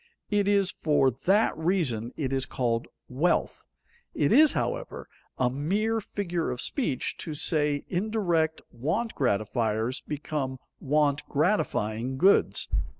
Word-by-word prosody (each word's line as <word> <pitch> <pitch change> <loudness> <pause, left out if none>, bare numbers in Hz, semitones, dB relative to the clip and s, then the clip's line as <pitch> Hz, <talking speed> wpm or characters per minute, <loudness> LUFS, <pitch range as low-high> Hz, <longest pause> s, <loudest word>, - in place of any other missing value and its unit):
It 205 -1 +2
is 200 -2 +3
for 145 -4 +2
that 195 - +2
reason 155 - -1
it 135 -4 -2
is 135 -1 0
called 115 -2 -1 0.2
wealth. 150 +8 0 0.5
It - - +2
is, 305 -1 +6
however, - - -3 0.3
a 125 -1 +1
mere 205 - 0
figure 175 -5 -3
of 125 - -4
speech 150 - -1
to 155 - -6
say 150 -1 0
indirect 175 -5 0
want 165 - -2
gratifiers 110 0 0
become 145 -3 -3 0.2
want 145 0 +1
gratifying 130 - 0
goods. 190 +7 +3
150 Hz, 120 wpm, -27 LUFS, 130-195 Hz, 0.5 s, is